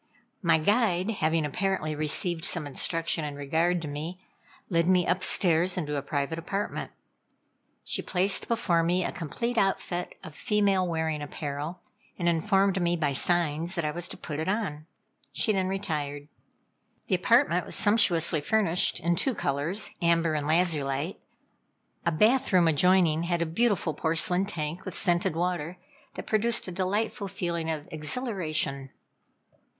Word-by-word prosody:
My 165 -4 +4
guide, 200 +2 +2
having 160 -5 0
apparently 170 0 -1
received 160 +3 -2
some 170 -3 -2
instruction 165 +3 -1
in 145 -1 -4
regard 165 +5 0
to - - -4
me, 155 +5 -5 0.5
led 170 -2 +1
me 180 -1 +4
upstairs 180 -1 +3
into 150 -4 -2
a 140 - -1
private 140 +3 -2
apartment. 195 +5 -3 0.9
She - - -1
placed 190 +1 0
before 205 -8 +1
me 175 +2 +1
a - - -2
complete 235 - -2
outfit 180 -2 -1
of 160 - -9
female 200 0 +1
wearing 160 -2 -1
apparel, 145 +3 -5 0.4
and 175 - -1
informed 195 +2 +2
me 175 0 +2
by 150 -4 0
signs 170 +3 +1
that 170 -3 -1
I 150 - 0
was 175 +2 -4
to - - -8
put 150 -2 -6
it 160 - -2
on. 180 -8 -2 0.5
She 215 - +2
then 190 -2 0
retired. 150 -7 -3 0.8
The - - -2
apartment - - +3
was - - -1
sumptuously 175 -7 +3
furnished 180 -1 +2
in 170 +2 +1
two 255 +8 +1
colors 150 +9 -2
amber 170 -1 +2
and 150 -1 -2
lazulite. 155 -1 0 0.9
A - - +4
bath 220 +11 +3
room 180 -3 +5
adjoining 165 0 +3
had 170 -1 0
a - - -2
beautiful 185 -1 +1
porcelain 180 +5 +1
tank 165 -3 -4
with 185 - -6
scented 175 -3 +2
water, 175 0 -2 0.4
that - - -6
produced 225 +1 +1
a - - -4
delightful 200 +3 -2
feeling 170 -3 -3
of 155 -2 -4
exhilaration. 155 - -2
170 Hz, 150 wpm, -27 LUFS, 155-190 Hz, 0.9 s, room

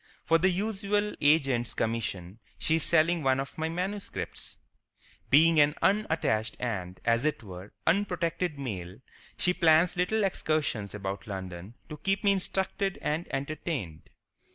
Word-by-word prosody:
For 165 0 +4
the 190 +3 +4
usual 205 +2 -1
agent's 135 -5 +3
commission 110 -4 -3 0.2
she 160 - +1
is 160 - 0
selling 170 +1 +3
one 135 -1 +2
of 135 +3 -5
my 160 +1 -1
manuscripts. 190 +4 -4 0.7
Being 160 +3 +6
an 145 0 +4
unattached 160 - +1
and, 95 -7 -4
as 115 +1 +2
it 155 -5 -1
were, 95 0 -10
unprotected 175 -3 0
male, 95 -9 -5 0.4
she 180 - +2
plans 165 0 +4
little 195 +5 +1
excursions 150 - -1
about 100 0 -5
London 95 +1 -7
to 150 - -8
keep 195 +5 -1
me 200 - +5
instructed 195 0 -1
and 160 +3 -1
entertained. 135 - -4
155 Hz, 135 wpm, -29 LUFS, 110-180 Hz, 0.7 s, Being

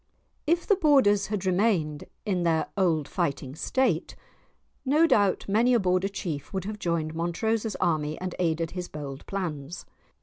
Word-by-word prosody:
If 340 +2 +2
the 405 - +4
Borders 265 - +4
had 205 -2 -3
remained 180 -6 +1 0.2
in 190 -4 0
their 165 -2 +1
old 165 -7 +1
fighting 135 -2 -2
state 260 +10 0 0.7
no 295 +5 +4
doubt 205 - +2
many 230 +5 +3
a - - +4
Border 185 0 +1
chief 160 -8 -5
would 190 -1 -3
have 210 +1 -5
joined 165 -3 -1
Montrose's 210 +7 -1
army 155 -3 0
and 185 -1 -4
aided 165 -2 0
his 180 -1 -5
bold 140 -3 -7
plans. 170 -4 -4
185 Hz, 155 wpm, -27 LUFS, 160-210 Hz, 0.7 s, the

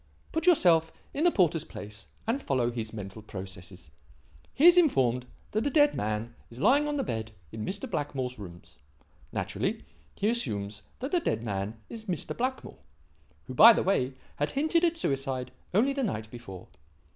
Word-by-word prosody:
Put 325 +2 -1
yourself 170 - +5 0.2
in 305 - 0
the - - +7
porter's 170 - +2
place 105 -8 -9 0.2
and 235 +6 0
follow 125 - 0
his 115 -2 -4
mental 100 -1 -7
processes. 95 -5 -10 0.6
He 295 - +2
is 350 0 +10
informed 125 - +3 0.2
that 215 +5 0
a - - +2
dead 290 +1 +4
man 110 +2 -2 0.2
is 120 - -11
lying 285 - +4
on 295 - -1
the 275 - 0
bed 110 - -3 0.2
in 110 -1 -5
Mr. 200 - -3
Blackmore's 135 - -3
rooms. 85 -4 -11 0.5
Naturally, - - -2 0.3
he 205 - 0
assumes 105 - -1 0.2
that 265 - -3
the 360 - +3
dead 115 - -1
man 105 0 -3
is 225 -1 -8
Mr. 180 -6 -3
Blackmore 255 +2 -3 0.6
who, 130 - -8
by 230 - +10
the - - 0
way, 135 -9 +1 0.2
had 145 - -1
hinted 315 +4 +2
at 335 -1 +2
suicide 135 - -2 0.2
only 240 +9 +3
the 275 - -2
night 110 - -3
before. 105 -7 -9
135 Hz, 170 wpm, -29 LUFS, -, 0.6 s, is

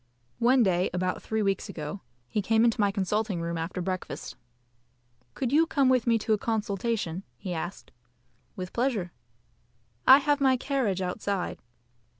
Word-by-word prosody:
One 250 +1 +5
day 185 -2 +2
about 185 0 -1
three 220 -1 -1
weeks 195 -1 -1
ago 155 +5 -6 0.3
he 210 - -1
came 225 +3 +3
into 230 -2 +2
my 205 - +4
consulting 200 0 -1
room 170 0 -3
after 165 +2 -3
breakfast. 185 0 -4 1.0
"Could 255 -3 -2
you 325 +2 +5
come 275 -5 +3
with 255 -2 +2
me 230 -1 +4
to 220 0 0
a 210 - +1
consultation?" 205 -4 -2 0.2
he 185 -3 -5
asked. 175 +3 -6 0.6
"With 185 -1 -6
pleasure." 235 -8 0 1.0
"I 265 - +11
have 290 0 +1
my 265 -2 +4
carriage 240 -9 -1
outside." 190 +1 -2
210 Hz, 155 wpm, -28 LUFS, 185-240 Hz, 1.0 s, I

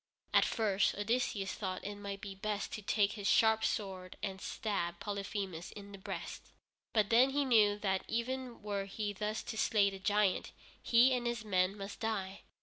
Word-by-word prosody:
At - - +6
first 205 -3 +1
Odysseus 205 -2 0
thought 185 -3 -4
it 205 - -3
might 200 -1 -6
be 200 -2 -6
best 205 +1 -3
to 215 - -4
take 205 0 +2
his 205 -2 -4
sharp 220 -1 +5
sword 185 -3 -2
and 190 -2 -3
stab 175 -5 -2
Polyphemus 195 -4 -4
in 200 -1 -10
the 200 - -9
breast. - - -6 0.5
But 215 -1 +2
then 245 +4 +6
he 285 +1 +1
knew 215 -5 +5
that 190 -2 0
even 245 0 -3
were 200 -2 -2
he 205 +1 -3
thus 210 +2 -3
to 220 - -6
slay 200 -2 +3
the 195 - -8
giant, 205 0 +1 0.3
he 245 +3 +5
and 245 -1 0
his 235 -2 -2
men 185 0 +2
must 200 0 -7
die. 200 -4 -2
205 Hz, 180 wpm, -34 LUFS, 195-220 Hz, 0.5 s, At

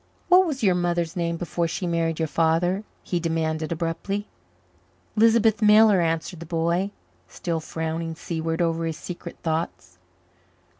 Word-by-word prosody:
"What 365 +1 +6
was 275 -6 -3
your 190 -3 +5
mother's 175 -2 -1
name 170 -1 -1
before 170 0 -1
she 165 +3 -3
married 165 -2 0
your 160 - 0
father?" 165 +5 +1 0.2
he 175 - -1
demanded 160 -1 -1
abruptly. 170 +5 -2 0.9
"Lisbeth 225 0 +4
Miller," 210 -2 +6
answered 165 +1 -1
the 170 - -8
boy, 170 +3 0 0.4
still 165 - -3
frowning 160 +1 -4
seaward 165 +1 -2
over 165 0 0
his 160 -1 -3
secret 175 -1 -8
thoughts. 125 - -3
170 Hz, 140 wpm, -24 LUFS, 165-185 Hz, 0.9 s, What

